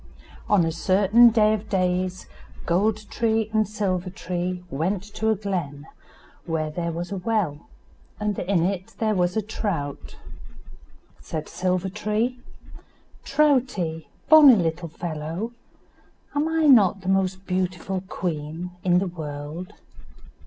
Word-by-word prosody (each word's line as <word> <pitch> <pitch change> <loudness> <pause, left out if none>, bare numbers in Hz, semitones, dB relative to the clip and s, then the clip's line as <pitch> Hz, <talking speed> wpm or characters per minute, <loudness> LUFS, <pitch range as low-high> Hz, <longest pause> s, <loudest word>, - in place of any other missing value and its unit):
On 200 -5 +4
a 165 - 0
certain 200 +7 +5
day 215 -1 +3
of 215 0 -3
the - - -19
days, 185 0 -1 0.4
Gold 210 +5 +1
tree 220 -2 0
and 215 -1 +2
Silver 190 -3 -2
tree 180 0 -4
went 180 +7 -1
to 220 - 0
a 220 - +3
glen, 175 -8 -4 0.6
where 155 -2 -1
there 170 +1 -3
was 175 +3 -5
a 200 - -2
well, 180 -7 -1 0.5
and 210 -1 -1
in 180 -2 +1
it 185 0 -3
there 220 -1 +1
was 180 0 +1
a 220 - +1
trout. 185 -9 -4 1.0
Said 155 -1 -5
Silver 185 +1 -1
tree, 215 +5 -1 0.8
"Troutie, 255 - +1 0.2
bonny 295 -4 +9
little 170 -2 -1
fellow, 165 +6 -5 0.8
am 310 0 +4
not 200 -5 +5
I - - -16
the 185 - -9
most 190 0 0
beautiful 185 0 -2
queen 165 -1 -4
in 180 -1 +3
the 190 - +1
world?" 155 +1 -7
185 Hz, 130 wpm, -24 LUFS, 170-215 Hz, 1.0 s, bonny